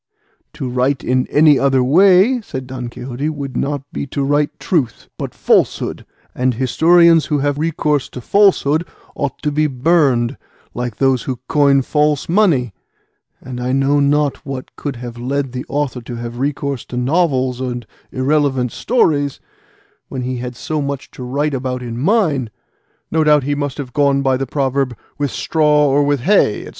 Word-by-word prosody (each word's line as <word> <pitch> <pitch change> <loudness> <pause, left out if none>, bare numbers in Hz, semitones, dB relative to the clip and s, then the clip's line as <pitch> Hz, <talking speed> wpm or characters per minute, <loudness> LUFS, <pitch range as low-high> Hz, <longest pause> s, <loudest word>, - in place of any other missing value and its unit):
"To 150 -4 -5
write 125 +2 0
in 130 0 0
any 150 -2 +5
other 135 -2 +2
way," 190 - +5
said 130 -10 -7
Don 125 -1 -6
Quixote, 125 +4 -4
"would 140 -4 -6
not 140 +1 -2
be - - -4
to 140 +1 -2
write 145 +1 0
truth, 145 - -2
but - - -6
falsehood, - - 0 0.3
and 125 -1 0
historians 165 +6 +4
who 150 - +1
have 145 0 -1
recourse 150 -3 0
to - - -8
falsehood 170 - +3 0.3
ought 140 -2 -3
to 150 - 0
be 155 +1 +1
burned, 135 -3 +1 0.4
like 120 -2 -4
those 135 -3 +2
who 125 -2 -3
coin 140 -3 +3
false 150 +1 +1
money; 165 - +2 0.7
and 125 -1 -7
I 125 +1 -1
know 135 +2 +2
not 145 0 +2
what 135 -2 -7
could 145 -3 -5
have 120 0 -8
led 135 +2 -2
the 125 0 -5
author 145 -3 -2
to 120 +1 -8
have 120 0 -6
recourse 140 -1 -2
to 125 - -7
novels 130 -2 +1
and 125 -2 -4 0.3
irrelevant 135 -2 +1
stories, 145 - +1 0.7
when 130 -2 -4
he 125 0 -3
had 125 0 -6
so 155 +5 -3
much 140 -1 -5
to - - -11
write 140 +4 -1
about 125 -1 -3
in 120 -1 -5
mine; 155 - +1 0.6
no 160 -1 +2
doubt 150 -2 +4
he 145 +2 -1
must 145 -1 -3
have 130 -4 -6
gone 140 -1 +2
by 135 -1 +2
the 135 +1 -3
proverb 135 -3 -1 0.2
'with 145 -1 0
straw 150 +1 +2
or 140 +1 +3
with 145 -2 0
hay, 150 - +2
&c. - - -9
140 Hz, 170 wpm, -17 LUFS, 125-150 Hz, 0.7 s, any